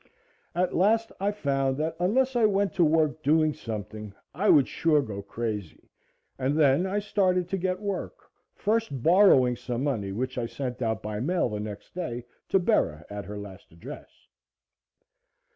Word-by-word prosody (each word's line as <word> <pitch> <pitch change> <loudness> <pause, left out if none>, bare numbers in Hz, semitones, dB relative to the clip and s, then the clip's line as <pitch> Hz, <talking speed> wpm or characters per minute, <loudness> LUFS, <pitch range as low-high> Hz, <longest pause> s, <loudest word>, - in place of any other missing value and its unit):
At 180 +1 0
last 225 +5 +2
I 200 +1 +1
found 135 -8 0
that 160 +2 -2
unless 255 +9 +2
I 230 -3 +5
went 200 -1 +1
to 185 -3 +3
work 155 -1 +2
doing 155 +1 +3
something, 105 -3 -7 0.2
I 195 +8 +1
would 140 -3 +6
sure 160 -2 +2
go 100 -5 -6
crazy, 105 -3 -5 0.5
and 135 +3 0
then 150 +4 +4
I 195 +2 -1
started 185 -4 +1
to 195 - -1
get 185 0 -1
work, 200 -2 -4 0.4
first 215 - -1
borrowing 165 -9 +5
some 120 +1 -4
money, 110 -9 -1
which 130 +5 -3
I 115 - -2
sent 125 0 -5
out 110 -4 -1
by 105 0 -4
mail 160 +3 0
the 105 -1 -4
next 105 -1 -7
day 125 -10 -4 0.2
to - - +4
Bera 175 - +1
at 100 -2 -5
her 105 +2 -7
last 100 -1 -10
address. 110 - -10
145 Hz, 165 wpm, -27 LUFS, 115-185 Hz, 0.5 s, would